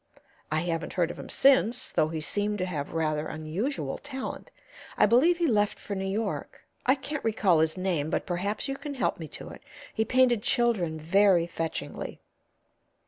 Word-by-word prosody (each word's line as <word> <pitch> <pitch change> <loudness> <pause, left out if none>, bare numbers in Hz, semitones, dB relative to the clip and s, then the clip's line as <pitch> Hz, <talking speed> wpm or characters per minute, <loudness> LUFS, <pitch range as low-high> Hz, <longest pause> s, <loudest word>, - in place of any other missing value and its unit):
I 155 0 +1
haven't 165 -1 -2
heard 175 -2 +1
of - - -10
him - - -8
since, 255 -3 +3
though 155 - +2
he 160 0 -4
seemed 205 +8 -1
to 185 - -1
have 155 -6 -4
rather 155 -2 0
unusual 155 - -3
talent. 265 -1 -6 0.5
I - - +6
believe 270 - +4
he 345 - +1
left 210 -7 +2
for 205 - -6
New 195 0 -2
York. 215 +3 -3 0.2
I 260 - +6
can't 290 +2 -5
recall 205 -6 +3
his 160 +2 +1
name, 175 -5 0
but - - -1
perhaps 195 +8 -2
you 275 0 -3
can 290 -1 -6
help 255 - 0
me 160 - -6
to - - -9
it. - - -11 0.3
He 220 - +1
painted 245 -1 +3
children 225 -10 +1
very 180 +2 +4
fetchingly." 165 -2 -5
195 Hz, 180 wpm, -28 LUFS, 165-240 Hz, 0.5 s, I